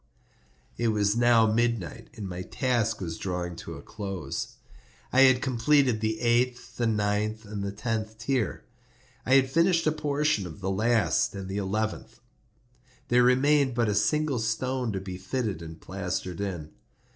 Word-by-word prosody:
It 120 - 0
was 105 -1 +2
now 120 -1 +5
midnight, 115 -3 0
and 105 -3 -6
my 90 -1 -5
task 115 +1 0
was 80 -3 -4
drawing 90 -2 -3
to - - -7
a - - -10
close. 95 -6 -5 0.6
I 130 - +6
had 130 -1 +6
completed 130 -2 +2
the 110 0 -1
eighth, 120 +1 0
the 120 - +1
ninth, 105 +1 0
and 105 -1 -5
the 100 - -2
tenth 110 +1 -3
tier. 120 0 -1 0.6
I 130 - +5
had 130 -1 +4
finished 165 +2 +3
a 155 - +4
portion 150 -8 0
of 85 +3 -10
the 95 0 -2
last 110 +1 +2
and 95 -1 -6
the 95 +1 -4
eleventh; 105 +2 -3 0.9
there 125 +1 +5
remained 130 +1 +4
but 115 -2 +2
a - - +1
single 130 +6 +1
stone 125 +2 -1
to 95 - -2
be 95 -1 -7
fitted 105 -3 -3
and 80 0 -9
plastered 90 0 -4
in. 85 -6 -4
110 Hz, 160 wpm, -27 LUFS, 100-125 Hz, 0.9 s, I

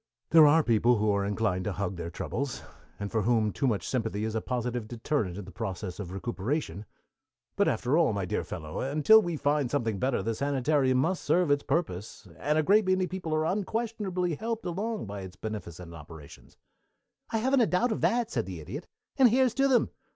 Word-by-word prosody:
"There 160 -2 +8
are 160 +2 +5
people 120 0 +3
who 105 0 +2
are 100 0 +1
inclined 100 -2 -1
to 105 - -1
hug 100 -1 -3
their 85 -1 -5
troubles, 135 +9 -4 0.4
and 100 0 -4
for 110 - +1
whom 110 -1 +2
too 95 +9 -1
much 105 -8 -1
sympathy 110 -4 -2
is 110 - -3
a 110 - -1
positive 125 -2 -3
deterrent 115 -5 -2
in 100 - -6
the 95 - -11
process 95 -1 -5
of 95 -4 -6
recuperation, 105 - -3 0.7
but - - +2
after 125 +4 +1
all, 165 - +3
my 100 -3 -2
dear 90 - -2
fellow, 80 -2 -6
until 155 +11 +5
we 175 -5 -3
find 145 -2 +1
something 115 -8 -1
better 130 -4 0
the 115 +2 -1
sanitarium 135 0 +1
must 170 +8 0
serve 175 -4 +2
its 145 0 +3
purpose, 135 - -3
and 150 +1 +1
a 155 - +3
great 205 +4 +4
many 185 0 +2
people 180 -3 -5
are 155 0 +1
unquestionably 195 -2 -1
helped 225 +7 -4
along 210 - -3
by 100 -1 -6
its 95 -1 -9
beneficent 90 -6 -7
operations." 80 -2 -13 0.7
"I 225 - 0
haven't 260 +4 +2
a 225 - +4
doubt 230 +7 +1
of 220 - -2
that," 240 -1 +1
said 115 -5 -2
the 90 -3 -6
Idiot, 115 - -7 0.3
"and 255 -2 +7
here's 255 0 +3
to 275 0 +2
them! 255 -3 +3
125 Hz, 200 wpm, -28 LUFS, -, 0.7 s, There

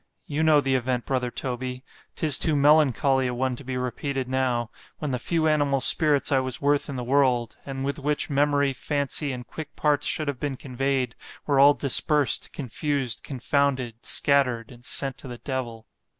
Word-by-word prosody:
You 150 +1 -3
know 155 -2 +5
the 135 -1 0
event, 125 -1 -1
brother 125 -2 -1
Toby——'tis 130 +4 -2
too 160 -3 +1
melancholy 140 -2 +3
a 125 - -3
one 130 0 -1
to 140 - -11
be 130 0 -4
repeated 130 +1 -3
now——when 130 +2 -3
the 125 - -2
few 160 +5 0
animal 145 -3 +2
spirits 145 +2 +2
I 135 - +4
was 130 -1 -4
worth 145 +1 +1
in 140 - -5
the 125 - -4
world, 125 -3 +1
and 135 -1 -4
with 140 +2 -3
which 145 +1 -1
memory, 140 -1 +1
fancy, 145 +1 -2
and 125 -1 -6
quick 155 +2 -9
parts 145 -1 +1
should 155 - -2
have 140 -3 -3
been 145 -3 -3
convey'd——were 135 +1 -2
all 140 +1 +7
dispersed, 145 +1 +3
confused, 140 -1 -2
confounded, 130 -3 -1
scattered, 125 -5 +2
and 120 -1 -15
sent 135 0 0
to - - -9
the 120 -1 -7
devil. 120 -4 -5
135 Hz, 170 wpm, -25 LUFS, 125-145 Hz, -, all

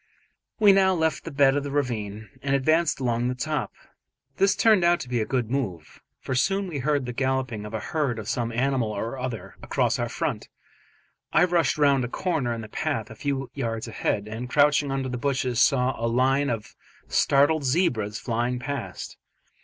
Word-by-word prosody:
We 210 -2 +7
now 190 -1 +4
left 160 -2 0
the - - -4
bed 140 -1 +4
of 145 - 0
the 145 - -4
ravine, 110 -7 -2
and 140 0 +1
advanced 155 +4 +2
along 120 -2 0
the 125 - -1
top. 150 +2 -2 0.7
This 195 0 +3
turned 215 -5 +4
out 175 0 +4
to 130 - -7
be 120 -2 0
a 110 - -2
good 125 -4 -1
move, 95 - -4 0.2
for 130 - -4
soon 195 +10 +1
we 155 -6 -4
heard 145 0 0
the 125 - -4
galloping 130 -4 -1
of 110 - -6
a - - -1
herd 135 0 -1
of 110 -1 -6
some 120 0 -1
animal 125 -1 0
or 115 +5 -4
other 125 -3 -5
across - - 0
our - - -1
front. - - -3 0.8
I 160 - +5
rushed 175 -3 +2
round 140 -3 +3
a - - -1
corner 155 -3 -1
in 115 -1 -3
the 110 - -8
path 105 0 -3
a - - -9
few 135 -2 -3
yards 115 -4 -3
ahead, 105 -2 -2
and 115 +3 -6
crouching 145 0 +3
under 135 -1 -2
the 125 -1 -4
bushes 130 -3 0
saw 130 -2 +3
a - - +2
line 135 +4 +2
of 115 -3 -4 0.3
startled 145 +2 +3
zebras 125 - +1
flying 120 +2 -1
past. 135 0 -5
130 Hz, 195 wpm, -25 LUFS, 115-145 Hz, 0.8 s, We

